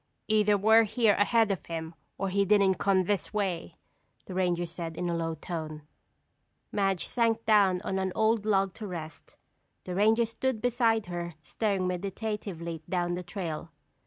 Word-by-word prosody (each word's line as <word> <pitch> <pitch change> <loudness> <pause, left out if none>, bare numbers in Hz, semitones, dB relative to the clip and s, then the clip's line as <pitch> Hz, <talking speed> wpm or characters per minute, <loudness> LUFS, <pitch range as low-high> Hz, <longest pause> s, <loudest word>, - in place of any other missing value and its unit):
"Either 210 -1 +3
we're 220 +3 +6
here 220 0 +3
ahead 220 +1 +3
of 190 -6 -3
him, 165 0 -5 0.2
or 195 - -1
he 200 +1 +2
didn't 200 -1 +3
come 190 -2 +3
this 200 +1 -2
way," 180 -5 -2 0.5
the 185 - -8
ranger 175 -2 +1
said 165 -1 -6
in 180 - -2
a - - -1
low 165 -1 -2
tone. 155 -2 -6 0.9
Madge 195 -3 0
sank 230 -2 0
down 200 -4 +4
on 190 -1 -1
an 190 -1 -1
old 220 -1 +2
log 195 -3 +2
to 215 - -7
rest. 160 -4 -8 0.5
The 180 - -5
ranger 220 +5 +4
stood 230 +1 -2
beside 230 -2 +2
her 175 -1 -5
staring 200 +1 -1
meditatively 180 -3 -4
down 175 -1 0
the 180 - -3
trail. 175 -3 -5
195 Hz, 160 wpm, -29 LUFS, 175-215 Hz, 0.9 s, we're